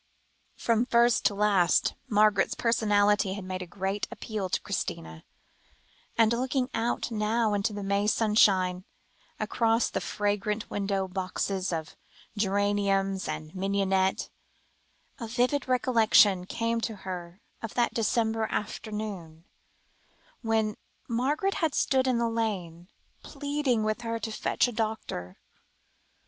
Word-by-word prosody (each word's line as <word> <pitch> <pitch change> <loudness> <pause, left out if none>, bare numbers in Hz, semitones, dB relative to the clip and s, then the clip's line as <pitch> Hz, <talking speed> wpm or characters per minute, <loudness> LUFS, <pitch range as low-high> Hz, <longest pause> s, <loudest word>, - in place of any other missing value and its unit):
From 230 +1 +1
first 235 0 +3
to 205 - +3
last, 200 -4 +3 0.2
Margaret's 210 -2 +3
personality 210 -3 +2
had 200 0 -6
made 185 0 -4
a 180 - -6
great 195 +2 -3
appeal 210 -4 -4
to - - 0
Christina, 80 0 -4 0.9
and 225 0 +4
looking 255 +2 -1
out 235 +1 -1
now 215 0 +1
into 205 +1 0
the 205 -1 -5
May 200 +1 +1
sunshine, 195 -5 +3 0.6
across 230 0 +1
the - - -2
fragrant 210 +1 -2
window 195 -1 -1
boxes 185 0 -2
of 160 -2 -4 0.4
geranium 200 -1 +1
and 155 0 -5
mignonette, 195 0 0 0.9
a 230 - -5
vivid 250 +5 0
recollection 225 -7 +4
came 230 +1 -1
to 225 -1 -3
her 180 -1 -6 0.2
of 225 - -6
that 240 -1 +1
December 225 -1 +1
afternoon, 205 -6 -5 1.0
when 220 -2 0 0.3
Margaret 285 +11 0
had 320 -4 +1
stood 260 -1 +2
in 255 -2 +2
the 235 0 +1
lane, 190 -7 -3 0.3
pleading 285 -5 -1
with 215 +2 -1
her 230 -1 -2
to 225 0 -5
fetch 215 - +1
a - - -3
doctor. 215 - -4
210 Hz, 125 wpm, -28 LUFS, 195-230 Hz, 1.0 s, and